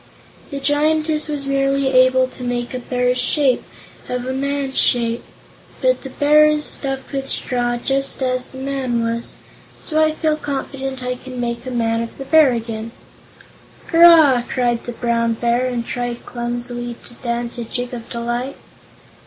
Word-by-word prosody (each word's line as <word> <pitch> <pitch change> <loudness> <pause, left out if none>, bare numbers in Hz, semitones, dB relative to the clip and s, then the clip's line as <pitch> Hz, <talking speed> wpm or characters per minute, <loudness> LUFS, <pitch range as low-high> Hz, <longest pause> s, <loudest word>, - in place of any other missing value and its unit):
The 280 - -4
Giantess 305 +2 +1
was 290 -2 -3
merely 275 0 +1
able 255 0 +4
to 255 - -13
make 245 0 -2
a 255 - -3
bear's 250 0 0
shape 260 +1 +2 0.5
of 250 0 -2
a 260 - -2
man's 275 0 -1
shape, 235 -1 +2 0.6
but - - +2
the 270 - -7
bear 300 +3 +5
is 300 0 +1
stuffed 270 -1 -2
with 270 -1 -3
straw, 240 -1 -1
just 270 +2 -1
as 255 0 -1
the 265 - -11
man 265 -3 -1
was. 230 +1 -3 0.4
So 315 -1 +1
I 310 0 +2
feel 310 -1 0
confident 270 -2 -4
I 250 0 -1
can 255 0 -8
make 235 +1 -3
a - - -2
man 230 -2 0
of 230 - -6
the 270 - -6
bear 305 -1 +6
again." 225 -1 -4 1.0
"Hurrah!" 330 -7 +7
cried 240 -2 0
the 240 - -5
Brown 230 -1 0
Bear, 235 +2 +1
and 240 -2 -2
tried 245 -1 -4
clumsily 240 0 -4
to - - -9
dance 235 0 -3
a - - -2
jig 245 +2 -4
of 235 -1 -7
delight. 240 +3 -3
255 Hz, 165 wpm, -20 LUFS, 240-275 Hz, 1.0 s, Hurrah